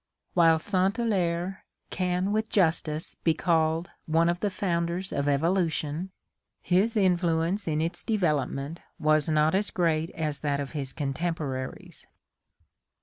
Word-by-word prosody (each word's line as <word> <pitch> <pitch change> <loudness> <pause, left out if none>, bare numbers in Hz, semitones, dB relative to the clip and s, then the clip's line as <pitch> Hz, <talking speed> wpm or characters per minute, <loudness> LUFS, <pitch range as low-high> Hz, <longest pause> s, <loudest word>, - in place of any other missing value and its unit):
While 165 -2 +5
St. 190 +3 0
Hilaire 190 -5 -1 0.3
can 180 +1 0
with 220 +1 0
justice 160 -4 +1
be 165 -2 +3
called 160 0 +1 0.2
one 165 +2 +3
of 175 0 0
the 205 - 0
founders 175 -1 -2
of 140 0 -1
Evolution, 160 +2 0 0.5
his 205 +6 +2
influence 175 0 +1
in 155 -1 0
its 165 +2 -2
development 155 - -1 0.2
was 155 0 +2
not 155 0 +3
as 200 +2 +1
great 165 -2 +1
as 155 -3 -2
that 145 -2 -1
of 140 -1 -4
his 140 -4 -4
con 140 -2 -3
temporaries. 150 -6 -4
170 Hz, 135 wpm, -27 LUFS, 155-185 Hz, 0.5 s, While